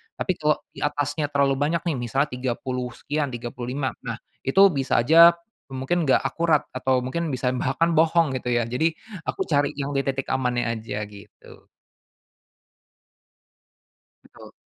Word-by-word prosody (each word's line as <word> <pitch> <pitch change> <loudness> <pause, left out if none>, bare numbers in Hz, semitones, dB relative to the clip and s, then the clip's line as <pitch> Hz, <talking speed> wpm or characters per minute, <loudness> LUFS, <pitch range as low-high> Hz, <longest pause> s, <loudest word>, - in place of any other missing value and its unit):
Tapi - - -1
kalau 150 0 +3 0.2
di - - -12
atasnya 145 +1 -1
terlalu 140 -2 +1
banyak 155 +3 +1
nih 170 -4 -1
misalnya 135 +5 0
30 125 0 -3
sekian 145 0 -2
35, 125 +2 -4 0.2
nah, 115 - -2 0.3
itu 135 +9 +4
bisa 135 -1 0
aja, 165 +7 +8 0.4
mmm, 135 - -6
mungkin 175 +4 0
nggak - - +4
akurat 165 -3 +2
atau 130 0 +1
mungkin 165 +5 -2
bisa 125 0 0
bahkan 165 +7 +1
bohong 160 -2 +3
gitu 125 - -5
ya, 120 0 +2
jadi 160 +7 +1 0.4
aku - - -3
cari 145 -1 +2
yang 140 0 -3
di - - +3
titik 135 0 -2
amannya 125 -2 0
aja 110 -1 -6
gitu. 100 -1 -16 2.6
Betul. - - -15
135 Hz, 145 wpm, -24 LUFS, 125-155 Hz, 2.6 s, aja